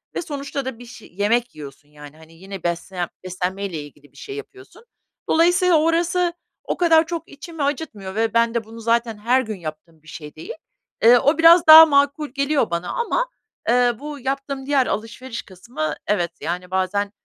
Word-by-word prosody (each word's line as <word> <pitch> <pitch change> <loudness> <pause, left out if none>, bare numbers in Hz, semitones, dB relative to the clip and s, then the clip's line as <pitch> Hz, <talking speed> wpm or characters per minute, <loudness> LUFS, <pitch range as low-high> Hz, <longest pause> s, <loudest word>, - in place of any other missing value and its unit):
ve - - -2
sonuçta 280 -3 -5
da 260 -3 -6
bir 245 - -11
şey, 230 -5 -14
yemek 235 +4 0
yiyorsun, 145 -1 -11
yani, 150 0 -14
hani, 160 0 -17
yine 190 +2 -10
beslen 175 +1 -3
beslenmeyle 185 0 -4
ilgili 145 -1 -17
bir 140 - -23
şey 405 - -8
yapıyorsun. 415 +1 -12 0.5
Dolayısıyla 350 0 +4
orası 345 +2 +1 0.3
o - - -3
kadar 330 -2 +4
çok 330 0 -5
içimi 310 +1 -7
acıtmıyor 250 -10 -4
ve 225 0 0
ben 230 0 +2
de 235 - -1
bunu 225 +2 -12
zaten 230 -1 0
her 245 +5 +2
gün 220 -4 -5
yaptığım 155 0 -10
bir - - -22
şey 150 -1 -10
değil. 155 - -8 0.5
Eee, 240 +2 +8
o 285 +5 +2
biraz 330 +1 +6
daha 320 +1 +12
makul 285 0 +1
geliyor 280 -1 0
bana 170 +1 -3
ama, - - -1 0.4
eee, 245 0 +3
bu 295 0 -7
yaptığım 275 +1 -4
diğer 275 -2 +2
alışveriş 230 +3 -5
kısmı 180 -5 -6
evet, 175 -5 0
yani, 180 +2 -4
bazen, 195 +2 -1
235 Hz, 175 wpm, -21 LUFS, 185-295 Hz, 0.5 s, daha